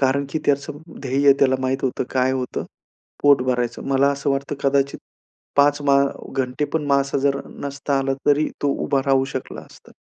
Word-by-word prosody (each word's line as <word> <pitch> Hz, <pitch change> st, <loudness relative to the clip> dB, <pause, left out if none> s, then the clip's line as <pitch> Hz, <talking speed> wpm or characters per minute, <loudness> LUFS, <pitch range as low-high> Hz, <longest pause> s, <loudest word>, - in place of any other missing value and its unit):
कारण 140 Hz, +1 st, +2 dB
की 160 Hz, -, -1 dB
त्याचं 145 Hz, +1 st, 0 dB, 0.2 s
ध्येय 140 Hz, +1 st, +4 dB
त्याला 130 Hz, -1 st, +4 dB
माहीत 130 Hz, 0 st, 0 dB
होतं. 130 Hz, -, -1 dB
काय 130 Hz, 0 st, +1 dB
होतं? 130 Hz, -1 st, -3 dB, 0.6 s
पोट 140 Hz, -3 st, +5 dB
भरायचं. 125 Hz, -2 st, -1 dB
मला 135 Hz, +1 st, +3 dB
असं 140 Hz, 0 st, -2 dB
वाटतं, 140 Hz, +1 st, -2 dB
कदाचित 140 Hz, 0 st, +1 dB, 0.6 s
5 145 Hz, +1 st, +4 dB
मां 140 Hz, -1 st, +4 dB, 0.3 s
घंटे 130 Hz, +2 st, -1 dB
पण 155 Hz, -2 st, -1 dB
मासा 140 Hz, 0 st, +1 dB
जर 140 Hz, 0 st, +1 dB, 0.2 s
नसता 140 Hz, 0 st, -2 dB
आला 135 Hz, 0 st, 0 dB
तरी 150 Hz, +1 st, +3 dB
तो 145 Hz, -, +2 dB, 0.2 s
उभा 135 Hz, -, +1 dB
राहू 135 Hz, -1 st, +3 dB
शकला 130 Hz, -, -5 dB
असता. -, -, -17 dB
140 Hz, 175 wpm, -21 LUFS, 130-140 Hz, 0.6 s, पोट